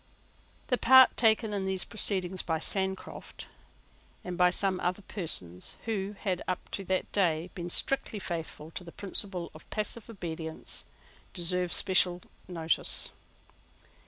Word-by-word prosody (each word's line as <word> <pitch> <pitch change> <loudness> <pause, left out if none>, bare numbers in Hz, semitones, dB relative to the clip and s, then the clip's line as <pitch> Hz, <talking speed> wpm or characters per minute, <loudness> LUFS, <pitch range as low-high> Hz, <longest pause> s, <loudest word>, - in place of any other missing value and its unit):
The 250 - +2
part 260 +1 +7
taken 220 -1 +3
in 200 -1 -1
these 190 -1 0
proceedings 190 -4 0
by 165 -1 -1
Sancroft, 190 +3 -4 0.8
and 180 -1 -5
by 180 0 +5
some 185 0 +1
other 180 +3 -2
persons 90 - -3
who 205 -2 -2
had, 185 -4 -1
up 185 - -4
to 195 - -4
that 185 0 -1
day, 175 -3 0
been 175 -1 -5
strictly 245 +3 0
faithful 165 -4 -6
to 180 - -6
the 170 - -11
principle 190 -2 -3
of - - -15
passive 215 +1 -4
obedience, 165 -6 -4 0.5
deserves 180 0 +2
especial 180 -2 +3 0.2
notice. 165 -3 +4
185 Hz, 130 wpm, -29 LUFS, 175-200 Hz, 0.8 s, part